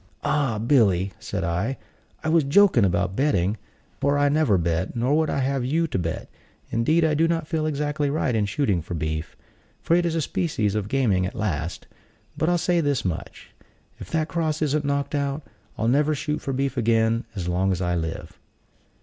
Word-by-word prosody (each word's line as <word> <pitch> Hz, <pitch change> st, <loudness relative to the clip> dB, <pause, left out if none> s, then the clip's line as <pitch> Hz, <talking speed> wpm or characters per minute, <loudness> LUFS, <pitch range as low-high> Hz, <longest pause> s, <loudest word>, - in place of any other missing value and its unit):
"Ah, 145 Hz, -6 st, +1 dB
Billy," 105 Hz, -6 st, +2 dB
said 105 Hz, -5 st, -4 dB
I, 90 Hz, +10 st, -1 dB, 0.5 s
"I 160 Hz, -, 0 dB
was 165 Hz, -1 st, +4 dB
joking 145 Hz, -, +5 dB
about 90 Hz, 0 st, +1 dB
betting, 110 Hz, -8 st, +1 dB, 0.4 s
for 140 Hz, +1 st, +2 dB
I 145 Hz, 0 st, +3 dB
never 145 Hz, -9 st, +3 dB
bet; 85 Hz, +4 st, -1 dB
nor 125 Hz, +5 st, +1 dB
would 160 Hz, 0 st, +2 dB
I -, -, -1 dB
have 135 Hz, -1 st, 0 dB
you 160 Hz, +7 st, +1 dB
to -, -, -1 dB
bet: 85 Hz, -2 st, -3 dB, 0.4 s
indeed, 155 Hz, +9 st, +2 dB
I 155 Hz, -, +2 dB
do 160 Hz, +2 st, +3 dB
not 165 Hz, -1 st, 0 dB
feel 155 Hz, -2 st, -1 dB
exactly 150 Hz, -1 st, -1 dB
right 140 Hz, -3 st, 0 dB
in 105 Hz, -2 st, +1 dB
shooting 100 Hz, -, 0 dB
for 85 Hz, +2 st, -6 dB
beef; 80 Hz, 0 st, -4 dB, 0.4 s
for 165 Hz, -, +2 dB
it 175 Hz, -, +3 dB
is 170 Hz, -1 st, -1 dB
a 165 Hz, -, +1 dB
species 130 Hz, -, -1 dB
of 105 Hz, -2 st, -2 dB
gaming 105 Hz, -9 st, +2 dB
at 100 Hz, -, -8 dB
last: 90 Hz, -6 st, -3 dB, 0.5 s
but 160 Hz, -, 0 dB
I'll 175 Hz, -, +3 dB
say 175 Hz, 0 st, +1 dB
this 145 Hz, -7 st, 0 dB
much: 90 Hz, -4 st, -5 dB, 0.5 s
if -, -, -9 dB
that 160 Hz, -1 st, 0 dB
cross 160 Hz, -2 st, -1 dB
isn't 150 Hz, 0 st, +1 dB
knocked 140 Hz, 0 st, -1 dB
out, 140 Hz, +1 st, -1 dB, 0.3 s
I'll 110 Hz, -, 0 dB
never 150 Hz, +5 st, +3 dB
shoot 150 Hz, +1 st, -3 dB
for 135 Hz, -, -3 dB
beef 135 Hz, 0 st, -1 dB
again 115 Hz, 0 st, +2 dB
as 90 Hz, -4 st, -4 dB
long 90 Hz, +2 st, +1 dB
as 90 Hz, -, -1 dB
I 90 Hz, -1 st, 0 dB
live." 80 Hz, -2 st, -4 dB
135 Hz, 195 wpm, -24 LUFS, 95-150 Hz, 0.5 s, joking